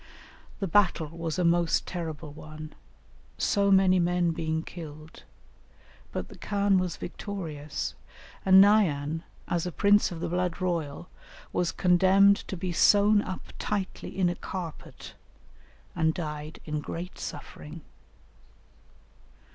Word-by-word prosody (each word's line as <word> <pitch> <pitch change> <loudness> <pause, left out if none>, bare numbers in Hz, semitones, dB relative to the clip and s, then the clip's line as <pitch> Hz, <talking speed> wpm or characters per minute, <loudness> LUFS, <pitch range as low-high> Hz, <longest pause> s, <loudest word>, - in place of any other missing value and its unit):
The 195 - -1
battle 175 -4 +2
was 165 0 -3
a 180 - +1
most 170 0 +2
terrible 160 -4 -5
one, 155 0 -9 0.6
so 200 -1 +2
many 190 -1 +5
men 175 0 +2
being 160 0 -2
killed, 155 -2 -10 0.9
but - - -4
the - - -14
khan 200 -2 +2
was 180 -2 -2
victorious, 155 -7 -5 0.5
and 190 0 +8
Naïan, 165 -7 +2 0.3
as 175 0 -1
a - - -3
prince 205 +2 +3
of 170 - -6
the - - -2
blood 180 0 -1
royal, 170 -3 -2 0.5
was 175 -2 +1
condemned 190 +2 +5
to 190 - -5
be 185 0 -3
sewn 205 +4 +5
up 185 - -7
tightly 195 -2 -3
in 185 -2 +3
a 175 - +1
carpet, 175 -3 -7 0.8
and 160 -2 +1
died 150 -2 -5
in 150 -1 -2
great 170 +4 -6
suffering. 150 +1 -8
175 Hz, 125 wpm, -28 LUFS, 160-190 Hz, 0.9 s, and